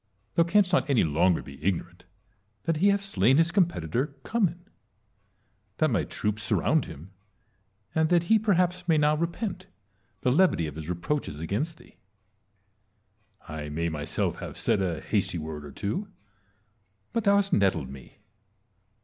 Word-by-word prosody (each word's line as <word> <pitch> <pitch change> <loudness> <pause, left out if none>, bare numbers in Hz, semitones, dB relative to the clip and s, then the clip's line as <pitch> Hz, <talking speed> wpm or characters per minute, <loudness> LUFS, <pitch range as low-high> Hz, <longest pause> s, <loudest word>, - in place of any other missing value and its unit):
Thou - - +3
canst 185 +2 +3
not 175 - +2
any 135 -5 +4
longer 85 +3 +2
be 70 0 -12
ignorant 90 -1 -2 0.6
that 165 -2 0
he 190 +6 +3
hath 200 0 +3
slain 130 - +3
his 165 +1 +3
competitor, 150 - 0
Cummin; 180 -6 -1 1.1
that 155 - +2
my - - +1
troops 105 0 -2
surround 105 - +1
hira; 75 - -10 0.9
and 160 0 +2
that 175 -1 +4
he 220 +5 +4
perhaps 180 -3 +1
may 160 -2 +4
now 150 0 +3
repent 180 +3 -3 0.5
the 125 - +2
levity 150 - +3
of 75 - -5
his 80 +2 -7
reproaches 90 - -2
against 115 - -2
thee. - - -19 1.5
I 75 -2 -6
may 85 +3 -1
myself 75 -2 -2
have - - -7
said 100 - +1
a 85 -5 -1
hasty - - 0
word 80 -2 -6
or 75 - -9
two; 105 - -3 1.1
but 230 - 0
thou 200 0 +5
hast 200 -1 +2
nettled 95 -10 +2
me. 70 -2 -12
140 Hz, 150 wpm, -27 LUFS, -, 1.5 s, thou